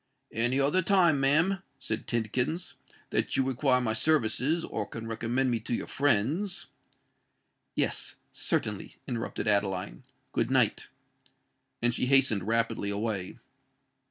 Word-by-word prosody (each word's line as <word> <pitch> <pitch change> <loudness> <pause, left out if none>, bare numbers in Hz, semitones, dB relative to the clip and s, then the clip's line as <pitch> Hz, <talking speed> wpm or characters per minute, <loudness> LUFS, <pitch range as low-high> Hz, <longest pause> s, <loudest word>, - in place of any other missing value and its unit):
"Any 120 +4 +1
other 145 +7 +3
time, 175 -5 +4
ma'am," 165 +8 +3 0.2
said 110 0 -4
Tidkins, 125 - -1 0.4
"that - - +1
you 135 - +4
require 130 0 +2
my 115 -3 0
services—or 150 +4 +1
can 115 0 -7
recommend 120 +3 0
me 115 - 0
to 115 +2 -2
your - - -4
friends——" 145 - +1 1.1
"Yes—certainly," - - -2
interrupted 115 -1 -3
Adeline. 95 - 0 0.3
"Good - - 0
night." - - +2 1.0
And 120 0 +3
she 125 - 0
hastened 125 -8 +4
rapidly 115 -2 0
away. 100 -2 -3
120 Hz, 115 wpm, -29 LUFS, 110-145 Hz, 1.1 s, time